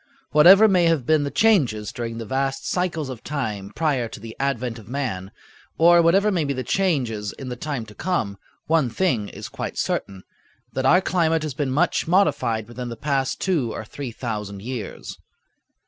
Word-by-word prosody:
Whatever 190 +8 +8
may 180 -4 +3
have 165 -7 +2
been 155 +1 +3
the - - -2
changes 140 - +2
during 115 -1 -5
the 115 - -5
vast 135 +3 -2
cycles 170 -5 -1
of 130 -3 -8
time 110 -9 -4
prior 140 -7 0
to 110 - -10
the 110 +1 -9
advent 125 -4 -2
of 105 - -14
man, 115 -8 -3 0.5
or 170 +1 +6
whatever 195 +5 +4
may 175 -5 +1
be 140 -1 -1
the 130 -1 -3
changes 125 - 0
in 130 - -8
the 125 - -4
time 135 -2 -4
to 105 - -13
come, 105 - -2 0.3
one 155 -5 +2
thing 120 - 0
is - - -8
quite - - -6
certain; 95 -1 -2 0.5
that 130 0 0
our 180 +6 +6
climate 165 -4 +1
has 155 -3 -3
been 140 0 -2
much 160 +7 +1
modified 120 - +2
within 120 +1 -6
the 115 - -7
past 135 -1 -1
two 155 -12 0
or 110 - -6
three 130 +2 -6
thousand 105 -4 -5
years. 125 -2 -6
135 Hz, 185 wpm, -23 LUFS, 115-165 Hz, 0.5 s, Whatever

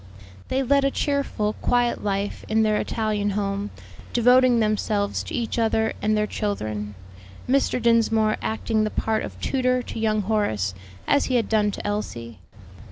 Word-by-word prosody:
They 265 +1 0
led 280 +2 +3
a 275 - +3
cheerful, 275 -8 -1
quiet 245 -1 +1
life 200 0 -2
in 220 0 +2
their 215 -1 +2
Italian 215 -2 -1
home, 200 0 -2 0.4
devoting 245 0 +5
themselves 210 -1 0
to - - -5
each 235 0 -2
other 220 -1 +1
and 215 0 +1
their 210 - +2
children; 110 - -3 0.5
Mr. 265 -1 +2
Dinsmore 225 -2 +3
acting 220 0 0
the 215 - 0
part 220 0 -1
of - - -8
tutor 255 -2 0
to - - -6
young 215 -1 +1
Horace, 110 - 0 0.3
as 285 - +3
he 255 - 0
had 230 -3 +2
done 210 -2 +2
to - - -6
Elsie. 120 - -4
220 Hz, 160 wpm, -24 LUFS, 205-240 Hz, 0.5 s, devoting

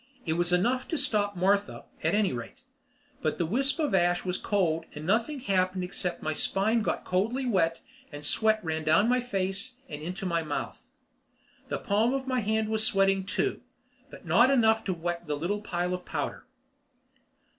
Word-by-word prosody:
It 160 - 0
was 175 +1 +1
enough 240 +9 +1
to 325 - -2
stop 205 -6 +1
Martha, 200 +3 +1 0.2
at - - +1
any 205 -7 +2
rate. 125 - -8 0.6
But 155 - -1
the 170 - 0
wisp 270 - +1
of 300 -7 0
ash 175 -1 +2
was 180 0 -1
cold 165 -5 0
and 150 +1 -7
nothing 235 - 0
happened 185 -4 +1
except 180 -1 -3
my 155 - -1
spine 215 +8 +1
got - - -2
coldly 225 +9 0
wet 170 -8 +1 0.3
and 145 0 -7
sweat 220 +6 +3
ran 160 0 -2
down 180 +8 +4
my 250 +1 +3
face 200 0 -3
and 150 -1 -7
into 180 +4 -5
my 170 -2 +1
mouth. 150 -2 -5 0.8
The - - -2
palm 225 +4 +1
of 270 -1 -3
my 255 -1 0
hand 220 0 0
was 220 0 +2
sweating 195 -2 +2
too, - - -1 0.5
but - - -13
not 240 +2 +5
enough 225 -4 +4
to 190 - 0
wet 170 0 -4
the 150 -1 -1
little 195 +7 -2
pile 180 -3 -2
of 180 0 -4
powder. - - -4
195 Hz, 180 wpm, -28 LUFS, 175-220 Hz, 0.8 s, not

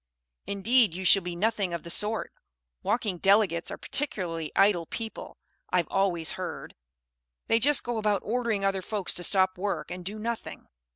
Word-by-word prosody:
"Indeed, 215 -1 +3
you 190 +1 -5
shall 195 - +7
be 175 -1 -5
nothing 200 -2 0
of 170 - -7
the 170 - -6
sort. 215 +3 -1 0.5
Walking 210 -6 -1
Delegates 195 -3 +3
are - - -5
particularly 175 - -1
idle 190 -5 +3
people, 225 -1 -6 0.3
I've 180 -3 +1
always 180 -4 +1
heard. - - -6 0.7
They 225 - +3
just 290 +5 +3
go 240 -2 -2
about 210 -3 0
ordering 225 -3 -1
other 195 -1 0
folks 200 0 -3
to 175 - -2
stop 185 0 +2
work 200 +1 -3
and 180 0 -6
do 200 +4 -5
nothing." 230 +1 -5
195 Hz, 165 wpm, -27 LUFS, 180-220 Hz, 0.7 s, shall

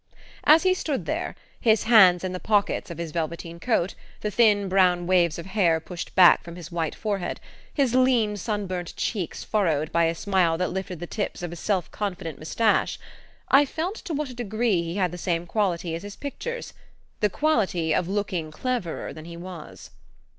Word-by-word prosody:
As 315 +3 +7
he 370 0 +4
stood 305 -7 -2
there, - - -3 0.2
his 220 -2 +3
hands 190 -6 +6
in 185 - -2
the 185 - -4
pockets 205 -2 +1
of 170 - -7
his 170 -2 -5
velveteen 170 +1 -4
coat, 205 -4 0 0.3
the 210 - -2
thin 210 -3 +4
brown 180 -2 +3
waves 175 -3 +3
of 170 - -7
hair 190 -5 +2
pushed 170 +2 -8
back 180 -2 +7
from 170 -1 -9
his 175 -2 -9
white 165 -2 -2
forehead, 200 -4 -3 0.3
his 270 -5 +1
lean 250 -5 +3
sunburnt 195 -4 -3
cheeks 190 -8 -3
furrowed 160 -8 0
by 170 0 +3
a 165 +1 0
smile 180 -3 +1
that 180 +1 -1
lifted 185 -2 -4
the - - -3
tips 205 -1 -4
of 175 - -4
a - - -6
self 185 0 -1
confident 185 -6 -4
moustache, 215 +8 +1 0.5
I 275 +2 +7
felt 325 +6 -3
to 335 -6 -3
what 290 -2 -3
a - - -8
degree 220 -4 0
he 170 +1 -4
had 185 -4 +1
the 180 - -7
same 170 -1 -1
quality 175 -3 -1
as 165 - -4
his 205 0 -8
pictures 480 - -6 0.5
the 210 - +2
quality 190 - +1
of 170 - +1
looking 190 -5 -2
cleverer 205 +1 -3
than 155 0 -10
he 170 0 -9
was. 175 -2 -10
185 Hz, 190 wpm, -25 LUFS, 170-220 Hz, 0.5 s, As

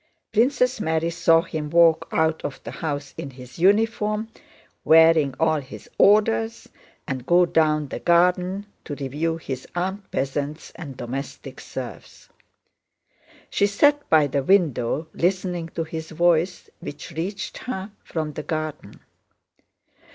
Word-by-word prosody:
Princess 250 +2 +2
Mary 160 0 0
saw 165 -1 +4
him 155 -4 -5
walk 170 0 +4
out 160 0 +1
of 140 - -5
the - - -6
house 145 -3 -4
in 140 - -5
his 125 +2 -13
uniform 210 +3 +2 0.5
wearing 160 -4 +5
all 160 -1 +2
his 135 -1 -11
orders 115 - +3 0.4
and 130 -1 -4
go 175 +1 +5
down 155 -3 +2
the - - -6
garden 180 +3 +2 0.2
to 145 - -6
review 150 +4 -2
his 130 -5 -6
armed 190 +3 -3
peasants 140 +3 -3
and 140 -6 -9
domestic 130 +3 -6
serfs. - - -9 1.2
She 200 - +3
sat 290 +8 +2
by 155 -2 +5
the 140 0 -1
window 155 -4 +2
listening 180 -2 -1
to 165 - -1
his 160 0 -6
voice 170 +2 +1
which 145 +4 -8
reached 185 +6 -4
her 205 -5 -5
from 155 -2 -4
the - - -5
garden. 155 -8 -5
160 Hz, 130 wpm, -23 LUFS, 145-185 Hz, 1.2 s, wearing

